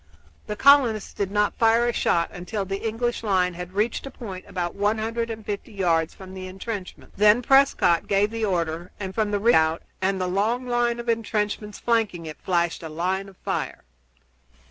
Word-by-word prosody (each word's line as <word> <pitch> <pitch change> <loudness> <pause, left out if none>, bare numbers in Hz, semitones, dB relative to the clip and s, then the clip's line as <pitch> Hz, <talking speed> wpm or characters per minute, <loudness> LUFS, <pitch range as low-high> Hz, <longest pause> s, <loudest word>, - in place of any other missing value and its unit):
The 210 - -3
colonists 255 -5 +4
did 200 -2 -2
not 205 +1 0
fire 230 +1 +4
a 240 - 0
shot 170 -6 +1
until 195 +3 -4
the 195 +1 -3
English 240 +2 -1
line 185 -4 +1
had 180 +1 -7
reached 220 +6 -1
a - - -5
point 195 -9 -8
about 175 -2 -3
one 205 +2 +1
hundred 230 +1 -2
and 220 -1 -6
fifty 205 +2 -5
yards 170 -5 +1
from 190 -1 -11
the 185 0 -7
intrenchments. 195 +1 -7
Then 210 +4 +5
Prescott 270 -10 +4
gave 205 +1 +2
the 225 0 -3
order, 170 -3 -1
and 190 -2 -5
from 215 -1 0
the 205 0 0
redoubt 165 -8 +3 0.2
and 190 0 +1
the 185 - 0
long 215 +7 0
line 240 -1 +1
of 235 - -6
intrenchments 210 -2 -1
flanking 220 -8 0
it 155 -1 -8
flashed 175 -2 0
a 165 - -6
line 185 +5 -2
of 190 - -18
fire. - - -3
205 Hz, 190 wpm, -24 LUFS, 185-225 Hz, 0.2 s, Then